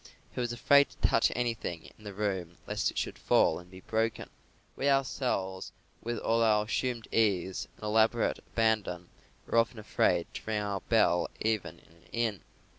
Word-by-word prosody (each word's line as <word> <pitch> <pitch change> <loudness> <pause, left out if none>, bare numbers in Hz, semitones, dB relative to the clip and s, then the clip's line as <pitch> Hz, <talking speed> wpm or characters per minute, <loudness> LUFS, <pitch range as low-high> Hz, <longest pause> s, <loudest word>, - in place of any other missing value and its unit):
He - - -5
was 120 -1 -1
afraid 140 +4 +5
to - - 0
touch 115 - +3
anything 115 -9 -3
in 110 - -20
the 100 - -6
room 95 -5 -2
lest - - 0
it - - -8
should - - -3
fall 80 - +3
and 90 0 -14
be 95 0 -12
broken. 110 +2 -2 0.4
We 140 - +1
ourselves, 125 -9 0 0.3
with 120 0 -3
all 115 +1 +1
our 105 -2 +3
assumed 120 0 -2
ease 100 -2 +1
and - - -17
elaborate 110 +2 +2
abandon, 105 -6 -1 0.4
are 115 - +3
often 115 +1 0
afraid 105 - +1
to - - -6
ring 110 -1 0
our 100 -1 -2
bell 95 -6 +2
even 110 -2 -1
in - - -23
an 85 +1 -23
inn. 115 -5 -1
110 Hz, 175 wpm, -30 LUFS, 95-115 Hz, 0.4 s, afraid